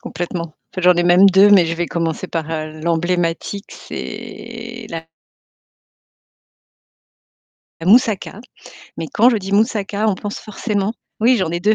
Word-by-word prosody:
complètement. 170 -2 -5 0.2
J'en 180 0 +5
ai 175 - +1
même 175 +3 +6
2, 195 +2 +6
mais 190 -4 +6
je 165 - -2
vais 175 +1 -2
commencer 165 +2 -3
par, 165 -2 -3
heu, 155 -1 -5
l'emblématique, 170 +3 -1
c'est 235 0 -8
la 165 -1 -5 2.8
la 165 - -6
moussaka, 220 -1 +3 0.6
mais 165 - -4
quand 240 +4 +5
je 235 - +1
dis 195 0 -6
moussaka, 210 -1 +1
on 205 - +2
pense 205 +2 -6
forcément 210 -1 -2 0.3
oui 245 +3 +4
j'en 185 -6 -1
ai 170 - -1
2,, 210 +5 +3
185 Hz, 145 wpm, -19 LUFS, 170-210 Hz, 2.8 s, même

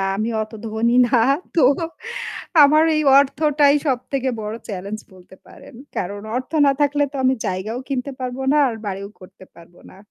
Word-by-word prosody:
আমি 215 +3 -2
অত 215 +1 -6 0.2
ধনী 230 +2 0
না। 245 0 +3 0.4
তো 330 - +4 1.0
আমার 305 +3 +5
এই 305 - +1 0.2
অর্থটাই 290 0 +3
সবথেকে 265 0 -1
বড় 210 +1 -5
challenge 200 +1 -6
বলতে 185 +1 -17
পারেন - - -15 0.2
কারণ 200 +3 -3 0.2
অর্থ 255 - -4 0.2
না 275 - +4
থাকলে 290 0 +2
তো - - -6
আমি 260 +1 +4
জায়গাও 200 +5 -3
কিনতে 275 0 -3
পারব 250 -1 -4 0.2
না 300 - +3
আর 235 - -4
বাড়িও 200 0 -5
করতে 190 0 -15
পারব 170 +1 -17 0.2
না। 190 - -16
240 Hz, 165 wpm, -20 LUFS, 200-280 Hz, 1.0 s, আমার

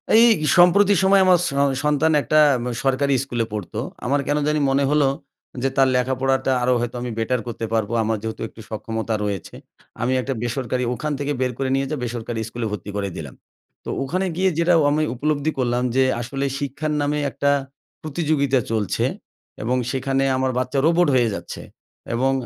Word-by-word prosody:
এই 225 - +8 0.3
সম্প্রতি 190 +3 +6
সময় 195 0 +5
আমার 185 -1 +6
স - - 0 0.3
সন্তান 150 +2 +2
একটা 155 +2 +2 0.2
উম 120 - -5 0.2
সরকারি 135 +1 +2
স্কুলে 120 -4 -2
পড়তো 105 -4 -4 0.3
আমার 140 +3 +1
কেন 145 +1 +1
জানি 150 0 +1
মনে 135 +1 +2
হল 150 0 +3 0.6
যে 135 - +2
তার 135 -1 +5
লেখাপড়াটা 130 +1 +1
আরও 125 +1 +3
হয়তো 120 +1 -3
আমি 125 0 -4
বেটার 120 +2 0
করতে 115 -1 -4
পারবো 110 -1 0
আমার 110 0 0
যেহেতু 110 0 -5
একটু 110 - -13
সক্ষমতা 110 +1 -3
রয়েছে। 100 -4 -4 0.5
আমি 125 +2 +1
একটা 135 +2 -3
বেসরকারি 125 +1 -2
ওখান 150 +5 -3
থেকে 145 0 -2
বের 130 -1 +1
করে 135 -1 -1
নিয়ে 135 0 0
যে - - 0
বেসরকারি 120 -1 -4
স্কুলে 115 0 -4
ভর্তি 105 -1 -6
করে 100 -1 -2
দিলাম। 75 -5 -7 0.5
তো - - -5
ওখানে 185 +8 -1
গিয়ে 190 +1 +3
যেটা 170 +1 +3 0.2
আমি 155 +1 +1
উপলব্ধি 150 +3 0
করলাম 125 -1 0
যে 130 - +5 0.2
আসলে 135 +4 -3
শিক্ষার 145 +2 -3
নামে 145 +1 0
একটা 140 +2 +1 0.5
প্রতিযোগিতা 150 -4 0
চলছে 110 -4 0 0.6
এবং 125 +3 0
সেখানে 135 0 0
আমার 130 0 0
বাচ্চা 130 +2 -1
রোবট 170 +2 +4
হয়ে 120 -3 +3
যাচ্ছে। - - -7 0.5
এবং 130 +3 +2
135 Hz, 175 wpm, -22 LUFS, 120-150 Hz, 0.6 s, এই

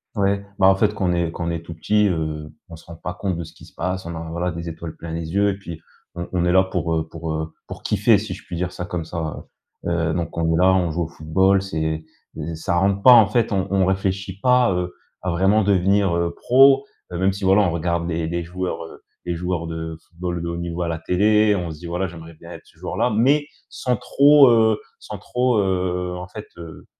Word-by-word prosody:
Ouais. 100 -1 0
Bah 95 - +6
en 95 - +6
fait 105 +1 +2
quand 95 -2 0
on - - +2
est 85 -1 0
quand 85 - -4
on 85 - -1
est 85 -1 -3
tout 85 0 -9
petit, 105 +6 +2
heu, 80 -4 -3 0.2
on 80 - -9
se - - -18
rend 85 - -10
pas 90 +2 -6
compte 95 0 -3
de 85 - -4
ce 80 - -11
qui - - -15
se - - -19
passe, 90 +1 -3
on 85 0 -5
a, 80 0 -6
voilà, 85 +2 -2
des 85 0 -5
étoiles 80 0 -7
plein 85 - -8
les 80 0 -5
yeux 100 +1 +3
et 100 - -2
puis 85 -4 -9 0.3
on 85 0 -4
on 90 -1 0
est 90 - +2
là 95 0 +6
pour, 85 -3 -2
heu, 80 -1 -1
pour, 80 -1 -5
heu, 80 0 -4
pour - - -9
kiffer - - +3
si - - -5
je - - -10
puis - - -6
dire 90 +1 -2
ça 90 - -6
comme 90 -3 -4
ça, 80 -1 -5 0.4
heu, - - -1
heu, 85 -1 0
donc 85 -1 -3
on 80 0 +1
est - - +2
là 95 +2 +5
on 90 -2 +2
joue 85 +2 -1
au - - -4
football 95 +5 +2
c'est, 80 -4 -3 0.3
e 80 +1 -4
ça 80 +2 -1
rentre 100 +2 +2
pas 130 - +9
en 115 -4 +8
fait, 115 +2 +1
on 95 -2 0
on 95 -1 +3
réfléchit 95 0 -2
pas 125 +2 +4
à, - - +1
heu, 90 0 -2 0.3
à 90 - -2
vraiment 95 +5 +3
devenir, 100 -1 +2
heu, 85 0 0
pro, 135 +6 +5 0.3
heu, 85 - -4
même 95 +2 +2
si 100 +1 -8
voilà 95 +2 +5
on 90 - +1
regarde 85 0 -1
des 80 -1 -2
des 85 +1 -2
joueurs 90 +1 -4 0.5
des 85 -1 -2
joueurs 90 -1 -3
de 80 -1 -5
football 85 0 -4
de 85 - -4
haut 85 - -3
niveau 85 0 -4
à - - -2
la 80 -1 -3
télé, 105 +5 +3
on 85 -3 -3
se 75 - -10
dit, 85 - -8
voilà: 90 +3 -1
«J'aimerais 80 -1 -11
bien 85 +2 -13
être - - -9
ce - - -24
joueur - - -5
là», - - +2
mais 135 +7 +2 0.2
sans 125 -1 -1
trop, 140 +1 +6
heu 110 -2 +4 0.2
sans - - -8
trop, 125 -1 0
heu, 90 -2 -1
en 90 +1 -7
fait, 105 +4 -9
heu, 80 -3 -10
90 Hz, 260 wpm, -22 LUFS, 85-100 Hz, 0.5 s, pas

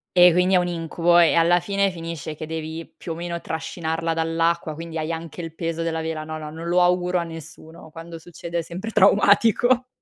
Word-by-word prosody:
Eh, 180 -1 +8
quindi 180 +2 +2
è - - +6
un 180 0 +1
incubo 170 0 +1
e 170 -2 +6
alla 170 +1 +4
fine 200 +1 0
finisce 165 -3 -6
che 155 - -6
devi 160 +1 -5
più 165 - -6
o - - -8
meno 170 0 -5
trascinarla 160 0 -3
dall'acqua, 165 0 0
quindi 165 0 -6
hai 155 +1 -2
anche 165 +1 -6
il 165 -1 -8
peso 165 0 -3
della 160 -1 -2
vela. 160 -1 -4
No, 155 0 -6
no, 155 -1 -7
non 165 +2 -7
lo 180 +1 +3
auguro 180 0 +2
a 170 - 0
nessuno. 160 0 -11
Quando 165 +1 -10
succede 170 +1 -6
è - - 0
sempre 180 +7 -6
traumatico. 225 +5 +4
165 Hz, 210 wpm, -23 LUFS, 160-175 Hz, -, Eh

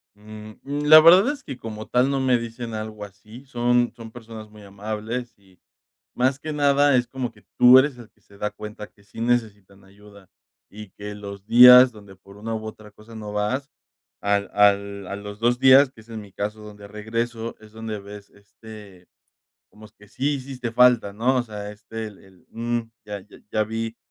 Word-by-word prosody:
Mm, 110 +1 -12
la 150 +2 +6
verdad 185 - +6
es 295 - -9
que 135 - -8
como 110 -2 -8
tal, 125 +2 +2
no 140 -1 -1
me 130 -2 +2
dicen 115 0 -7
algo 110 -1 -6
así, 110 +6 -15
son 120 -1 +1
son 115 -1 -11
personas 110 -2 -11
muy 105 0 -16
amables, 110 +4 -6
y 95 -2 -25 0.6
más 130 +2 +1
que 155 +1 -6
nada, 145 -1 +3
es 120 -1 0
como 125 -2 -5
que, - - -23
tú 125 +1 +8
eres 135 -1 +1
el 120 -3 -12
que - - -36
se 100 - -21
da 105 - -2
cuenta 105 0 -9
que 100 - -27
sí 100 +2 -12
necesitan 105 -5 -2
ayuda, 100 0 -18 0.4
y 105 -1 -11
que 105 +2 -9
los 100 -1 -9
días 125 +2 +9
donde 100 -3 -15
por 100 +1 -18
una 115 +2 -5
u 110 0 -5
otra 110 -1 -10
cosa 110 +2 -16
no 105 -1 -7
vas, 115 +7 -2 0.5
al 100 0 0
al 100 -1 +2
a 100 - -5
los 105 +1 -9
2 120 +1 +1
días, 135 +1 +6
que 110 - -17
es 110 - -26
en 110 -1 -7
mi 100 -2 -14
caso, 105 +3 -5
donde 105 -1 -12
regreso, 115 +2 -4
es 110 -1 -17
donde 110 -1 -6
ves, 100 0 -12
este, 100 -2 -15 0.6
como 110 0 -15
que 105 - -18
sí 145 +7 -1
hiciste 130 -3 -6
falta, 120 -4 +4
¿no?, 125 +5 +1
o 125 - +1
sea, 105 -3 -8
este, 110 +1 -8
el 105 - -16
el, 95 -2 -22
mm, 120 +1 -2 0.3
ya 100 -2 -7 0.3
ya 110 - 0
vi, 115 +1 -5
110 Hz, 195 wpm, -23 LUFS, 105-125 Hz, 0.6 s, días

